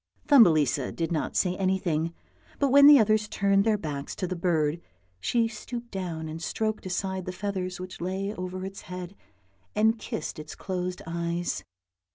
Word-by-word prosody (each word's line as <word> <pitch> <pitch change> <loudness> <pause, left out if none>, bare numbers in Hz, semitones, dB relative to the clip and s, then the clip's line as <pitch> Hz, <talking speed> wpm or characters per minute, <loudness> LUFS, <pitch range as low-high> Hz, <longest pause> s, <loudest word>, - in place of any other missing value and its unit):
Thumbelisa 155 - +5
did 165 0 -3
not 160 - -2
say 180 -1 +2
anything, 180 -4 0 0.5
but 280 - +2
when 280 +1 +9
the 295 -1 +10
others 215 -2 +3
turned 200 -1 +2
their 220 -2 +3
backs 145 -6 -5
to - - -2
the 185 +1 -3
bird, 165 -2 +1 0.4
she 230 - +1
stooped 235 +2 -7
down 170 -5 -4
and 160 +1 -6
stroked 215 +2 -2
aside 190 0 -2
the 185 - -3
feathers 185 -1 -3
which 185 -1 -8
lay 190 +3 -2
over 185 -1 -5
its 195 0 -7
head, 180 +1 -6 0.6
and 220 +2 +3
kissed 155 - -5
its 150 0 -8
closed 180 -1 -4
eyes. 170 - -2
185 Hz, 165 wpm, -27 LUFS, 170-210 Hz, 0.6 s, the